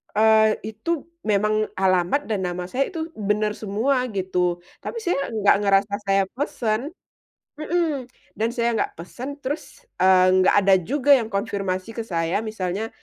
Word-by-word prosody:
eee, 220 Hz, 0 st, +4 dB, 0.2 s
itu 325 Hz, +8 st, -3 dB, 0.2 s
memang 215 Hz, +1 st, +1 dB
alamat 185 Hz, +8 st, +2 dB
dan 205 Hz, -4 st, -1 dB
nama 180 Hz, 0 st, -3 dB
saya 265 Hz, +8 st, -1 dB
itu 325 Hz, -3 st, -4 dB
benar 210 Hz, 0 st, 0 dB
semua 230 Hz, +6 st, 0 dB
gitu 180 Hz, -3 st, -1 dB, 0.2 s
tapi 465 Hz, -, -4 dB
saya 350 Hz, -, -1 dB
nggak 210 Hz, -2 st, +4 dB
ngerasa 200 Hz, 0 st, +2 dB
saya 195 Hz, 0 st, +2 dB
pesen 245 Hz, -1 st, -2 dB, 0.7 s
mhm, 310 Hz, -5 st, -1 dB, 0.3 s
dan 225 Hz, -, +2 dB
saya 235 Hz, 0 st, +1 dB
nggak 225 Hz, -, -2 dB
pesen, 250 Hz, -, -7 dB
terus, 295 Hz, -, -6 dB, 0.2 s
eee, 185 Hz, 0 st, +5 dB
nggak 185 Hz, -, +4 dB
ada 195 Hz, 0 st, +6 dB
juga 280 Hz, -, +2 dB
yang 235 Hz, -5 st, +4 dB
konfirmasi 195 Hz, -1 st, -3 dB
ke 230 Hz, -, -5 dB
saya 170 Hz, +2 st, -1 dB
misalnya 215 Hz, -1 st, -3 dB
215 Hz, 145 wpm, -23 LUFS, 190-255 Hz, 0.7 s, ada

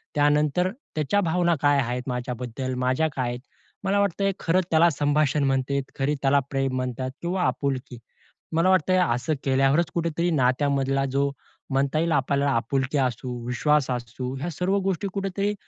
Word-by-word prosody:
त्यानंतर 150 Hz, +4 st, +2 dB, 0.3 s
त्याच्या 155 Hz, +7 st, +1 dB
भावना 175 Hz, -1 st, +2 dB
काय 145 Hz, -1 st, +4 dB
आहेत 125 Hz, 0 st, -2 dB
माझ्याबद्दल? 125 Hz, 0 st, -4 dB
माझ्या 130 Hz, +5 st, +1 dB
काय 125 Hz, -2 st, -1 dB
आहेत? 120 Hz, 0 st, -4 dB, 0.4 s
मला 200 Hz, +1 st, +1 dB
वाटत 200 Hz, -1 st, 0 dB
आहे, 195 Hz, 0 st, +3 dB
खरं 180 Hz, +2 st, +2 dB
त्याला 165 Hz, +1 st, +5 dB
संभाषण 145 Hz, 0 st, +1 dB
म्हणतेत. 135 Hz, +1 st, 0 dB, 0.2 s
खरी 140 Hz, +2 st, +1 dB
त्याला 140 Hz, +1 st, +4 dB
प्रेम 135 Hz, -1 st, 0 dB
म्हणतात 130 Hz, 0 st, -3 dB
किंवा 180 Hz, +2 st, -1 dB
आपुलकी. 130 Hz, -3 st, -2 dB, 0.6 s
मला 165 Hz, +3 st, +3 dB
वाटतंय 185 Hz, 0 st, +3 dB
असं 125 Hz, +7 st, 0 dB
केल्यावरच 135 Hz, +5 st, +2 dB
कुठेतरी 170 Hz, 0 st, 0 dB
नात्यामधला 135 Hz, 0 st, +1 dB
जो 140 Hz, +1 st, +1 dB, 0.4 s
म्हणता 135 Hz, +2 st, +1 dB
येईल 165 Hz, +1 st, +1 dB
आपल् 140 Hz, 0 st, +1 dB
आपुलकी 135 Hz, +2 st, 0 dB
असू, 125 Hz, -1 st, -1 dB, 0.2 s
विश्वास 145 Hz, +3 st, +1 dB
असू 125 Hz, +1 st, -4 dB
ह्या 165 Hz, +6 st, -3 dB
सर्व 180 Hz, +5 st, 0 dB
गोष्टी 195 Hz, +1 st, -1 dB
कुठेतरी 195 Hz, +1 st, -1 dB
140 Hz, 155 wpm, -25 LUFS, 130-170 Hz, 0.6 s, त्याला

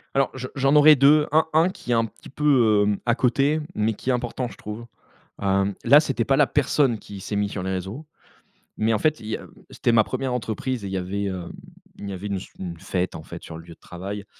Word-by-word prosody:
Alors 135 Hz, -, +3 dB
je 130 Hz, -1 st, -5 dB
j'en 135 Hz, +1 st, +2 dB
aurais 150 Hz, +1 st, +8 dB
2, 150 Hz, +2 st, +5 dB
un 160 Hz, +2 st, +3 dB
un 165 Hz, +3 st, +4 dB
qui 185 Hz, -, -11 dB
est -, -, +4 dB
un 115 Hz, -, +2 dB
petit 110 Hz, -, -13 dB
peu, 125 Hz, -8 st, +3 dB
hem, 105 Hz, -1 st, 0 dB
à 120 Hz, -1 st, +2 dB
côté, 135 Hz, +5 st, +1 dB
mais 110 Hz, +1 st, 0 dB
qui 130 Hz, -, -5 dB
est -, -, +2 dB
important 125 Hz, +1 st, -2 dB
je -, -, -12 dB
trouve, 105 Hz, +3 st, -7 dB, 0.6 s
hem, 100 Hz, 0 st, +1 dB
là 140 Hz, +5 st, +7 dB
c'était 135 Hz, -6 st, -1 dB
pas 135 Hz, +1 st, +2 dB
la 145 Hz, -, +6 dB
personne 135 Hz, -4 st, +1 dB
qui 100 Hz, -1 st, -10 dB
s'est 105 Hz, -, -5 dB
mis 100 Hz, 0 st, 0 dB
sur 95 Hz, -2 st, -5 dB
les 95 Hz, -, -2 dB
réseaux, 95 Hz, -, -5 dB, 0.7 s
mais 110 Hz, +1 st, +1 dB
en 110 Hz, -, +1 dB
fait 155 Hz, 0 st, +1 dB
il 110 Hz, -, -9 dB
y 110 Hz, -, -2 dB
a -, -, -12 dB, 0.2 s
c'était 120 Hz, -, 0 dB
ma 110 Hz, -1 st, +6 dB
1re 130 Hz, +3 st, -3 dB
entreprise 125 Hz, +1 st, -3 dB
et -, -, -4 dB
il -, -, -6 dB
y -, -, 0 dB
avait, 95 Hz, +2 st, -3 dB
hem 95 Hz, -3 st, -5 dB, 0.5 s
il 100 Hz, -, -6 dB
y -, -, -4 dB
avait 95 Hz, +2 st, -6 dB
une 100 Hz, -1 st, -2 dB
s 95 Hz, -, -8 dB
une 85 Hz, -3 st, -6 dB
fête, 90 Hz, 0 st, -2 dB
en -, -, -7 dB
fait, -, -, -10 dB
sur 80 Hz, -, -9 dB
le 80 Hz, -, -9 dB
lieu 85 Hz, -1 st, -13 dB
de -, -, -50 dB
travail, 100 Hz, +3 st, -7 dB
115 Hz, 260 wpm, -24 LUFS, 100-135 Hz, 0.7 s, aurais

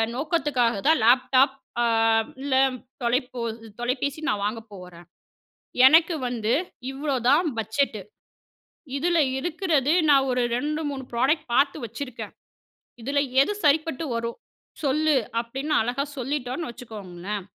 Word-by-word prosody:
நோக்கத்துக்காகதான் 280 Hz, -, +1 dB
laptop 260 Hz, +2 st, +4 dB, 0.3 s
அ -, -, +3 dB, 0.6 s
இல்ல 275 Hz, -1 st, 0 dB, 0.5 s
தொலைபோ 250 Hz, +1 st, -1 dB, 0.4 s
தொலைபேசி 260 Hz, +5 st, -2 dB
நான் 205 Hz, -1 st, -1 dB
வாங்கப் 225 Hz, +1 st, -4 dB
போறேன். 180 Hz, -2 st, -12 dB, 0.8 s
எனக்கு 325 Hz, +4 st, +5 dB
வந்து 230 Hz, -2 st, -1 dB, 0.4 s
இவ்வளவுதான் 275 Hz, +2 st, +1 dB
பட்ஜெட்டு. 220 Hz, +2 st, -1 dB, 1.0 s
இதுல 340 Hz, +3 st, +1 dB, 0.2 s
இருக்கிறது 315 Hz, -3 st, 0 dB, 0.2 s
நான் 270 Hz, -2 st, +5 dB
ஒரு 250 Hz, 0 st, +1 dB
2, 300 Hz, +5 st, -2 dB
3 275 Hz, -2 st, -5 dB
ப்ரோடக்ட் 260 Hz, +7 st, +1 dB
பார்த்து 280 Hz, +3 st, +3 dB
வச்சிருக்கேன். 235 Hz, +2 st, -7 dB, 0.7 s
இதுல 280 Hz, +4 st, 0 dB, 0.2 s
எது 415 Hz, -, -1 dB
சரிப்பட்டு 315 Hz, +1 st, +2 dB
வரும்? 230 Hz, 0 st, -4 dB, 0.5 s
சொல்லு." 300 Hz, +2 st, +2 dB, 0.2 s
அப்டின்னு 270 Hz, +6 st, -3 dB
அழகா 245 Hz, +5 st, -2 dB
சொல்லிட்டோனு 265 Hz, +2 st, -3 dB
வச்சுக்கோங்களேன், 205 Hz, -4 st, -7 dB
265 Hz, 105 wpm, -25 LUFS, 235-295 Hz, 1.0 s, எனக்கு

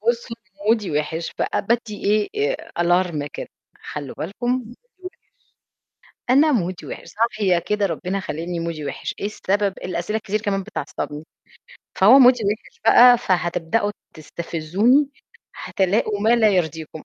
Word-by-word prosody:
وصلوأ 235 Hz, +1 st, -1 dB, 0.3 s
ومودي 215 Hz, -3 st, +2 dB
وحِش 150 Hz, +3 st, -2 dB
فأ -, -, 0 dB
بادّي 225 Hz, -1 st, -2 dB, 0.3 s
إيه 440 Hz, +4 st, 0 dB, 0.2 s
Alarm 175 Hz, -4 st, +1 dB
كده: -, -, -7 dB, 0.4 s
"خلّوا 145 Hz, -3 st, -6 dB
بالكم 205 Hz, +8 st, -5 dB
مودي 250 Hz, -2 st, -1 dB
وحِش. 250 Hz, -, -18 dB, 1.4 s
أنا 295 Hz, +4 st, +5 dB
مودي 185 Hz, -7 st, -2 dB
وحِش، -, -, -8 dB
صاحية 210 Hz, -5 st, +1 dB
كده 200 Hz, +4 st, 0 dB
ربنا 185 Hz, +3 st, -3 dB
خالقني 170 Hz, 0 st, -4 dB
مودي 165 Hz, -2 st, -4 dB
وحِش، -, -, -5 dB
إيه -, -, -1 dB
السبب؟ 200 Hz, -1 st, -1 dB
الأسئلة 180 Hz, +3 st, -2 dB
الكتير 215 Hz, -1 st, -2 dB
كمان 200 Hz, -2 st, -1 dB
بتعَصّبني، 150 Hz, -2 st, -6 dB, 0.7 s
فهو 225 Hz, +8 st, +7 dB
مودي 250 Hz, -1 st, +7 dB
وحِش 210 Hz, +2 st, -4 dB
بقى، 245 Hz, +2 st, +8 dB
فهتبدأوا 185 Hz, +2 st, 0 dB, 0.2 s
تستفزوني، 175 Hz, -, 0 dB, 0.5 s
هتلاقوا 205 Hz, +2 st, 0 dB
ما 220 Hz, -, +2 dB
لا 220 Hz, -2 st, +4 dB
يرضيكم" 160 Hz, -4 st, -2 dB
200 Hz, 130 wpm, -22 LUFS, 170-230 Hz, 1.4 s, بقى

